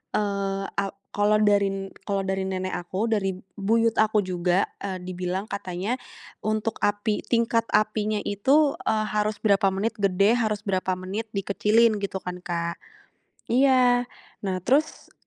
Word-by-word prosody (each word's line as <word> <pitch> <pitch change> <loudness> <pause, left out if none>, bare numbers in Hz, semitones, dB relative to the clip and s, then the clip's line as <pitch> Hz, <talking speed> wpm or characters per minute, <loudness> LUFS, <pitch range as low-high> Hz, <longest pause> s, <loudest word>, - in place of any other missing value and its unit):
eee, 200 -1 -1 0.2
a 200 - +1 0.3
kalau 205 +1 +3
dari 195 -2 +1 0.2
kalau 195 -1 0
dari 190 0 -1
nenek 185 0 -3
aku, 190 +6 -2
dari 195 -3 0 0.2
buyut 225 +3 +2
aku 215 -1 +3
juga, 180 0 +1 0.2
eee, 190 -2 -5
dibilang 180 +1 -3
katanya 200 +3 -3 0.4
untuk 215 +1 -2
api 205 +1 +1
tingkat 230 -1 +1
apinya 215 0 +1
itu, 275 +9 +2
eee, 215 -1 +2
harus 210 0 0
berapa 200 -1 +4
menit 225 +3 -2
gede, 200 +4 +3
harus 215 -2 -1
berapa 185 -2 0
menit 190 +5 -5
dikecilin 210 +3 +3
gitu 200 -1 -3
kan, 180 0 -5
Kak. 170 -1 -3 0.7
Iya, 250 -1 +4 0.3
nah 190 -2 -2
terus 290 +6 0
205 Hz, 140 wpm, -25 LUFS, 190-220 Hz, 0.7 s, berapa